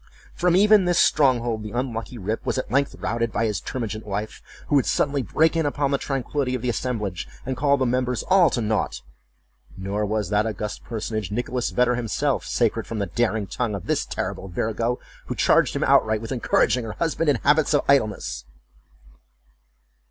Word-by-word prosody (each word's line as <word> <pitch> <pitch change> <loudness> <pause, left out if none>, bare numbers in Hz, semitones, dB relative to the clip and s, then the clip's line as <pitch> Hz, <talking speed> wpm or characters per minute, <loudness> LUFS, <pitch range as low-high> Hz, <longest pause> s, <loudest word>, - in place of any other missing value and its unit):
From 175 0 +2
even 205 0 +6
this 175 -1 +2
stronghold 120 -6 +3
the 105 - -6
unlucky 120 -1 -3
Rip 110 +2 -3
was - - -1
at 130 - -3
length 140 +2 +1
routed 115 +1 -2
by 115 - 0
his 105 -3 -1
termagant 110 -3 -4
wife, 105 +1 -5 0.3
who - - -2
would 135 - +3
suddenly 140 -1 +1
break 160 +8 +2
in 165 -2 +1
upon 145 -1 0
the 140 - +1
tranquillity 135 -1 -2
of 125 - -5
the 125 - 0
assemblage 105 -7 -3 0.2
and 130 0 -2
call 140 +2 +2
the 130 - +1
members 125 0 0
all 185 -3 +5
to 120 - -1
naught; 110 -1 -1 0.7
nor 100 +2 -2
was 105 0 -1
that 105 +1 +2
august 105 0 -5
personage, 110 -4 -4
Nicholas 125 +2 -2
Vedder 125 0 +2
himself, 125 +4 -1
sacred 115 -1 0
from 115 - -4
the 100 - 0
daring 110 +2 0
tongue 110 +1 -2
of 95 - -7
this - - 0
terrible - - -4
virago, 115 +6 -1 0.3
who - - -3
charged - - +3
him - - 0
outright 110 0 +3
with 115 +3 -7
encouraging 125 0 +2
her 110 -2 -5
husband 165 -1 0
in 145 - +4
habits 150 +4 +3
of 145 - +2
idleness. 105 - +1
120 Hz, 185 wpm, -24 LUFS, 110-140 Hz, 0.7 s, even